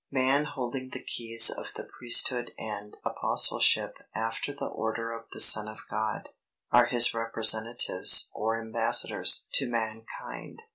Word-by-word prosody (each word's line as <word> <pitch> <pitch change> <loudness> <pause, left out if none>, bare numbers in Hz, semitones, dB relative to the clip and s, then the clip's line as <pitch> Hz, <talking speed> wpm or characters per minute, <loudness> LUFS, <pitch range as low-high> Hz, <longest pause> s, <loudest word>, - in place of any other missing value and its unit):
Man 135 +3 +1
holding 130 -2 -6
the - - -7
keys 115 -1 +3
of - - -8
the - - -7
Priesthood 120 0 +1
and 105 -1 -8
Apostleship - - +2 0.2
after 115 +5 -4
the 140 - -7
order 115 +1 -4
of 115 0 -9
the - - -8
Son 105 -1 +5
of 110 0 -10
God, 110 0 -4 0.4
are - - +5
his 120 -1 +4
representatives, 115 0 +2
or 110 +1 -2
embassadors, 110 0 0
to 135 -3 0
mankind. 115 - -7
115 Hz, 135 wpm, -27 LUFS, 110-125 Hz, 0.4 s, Son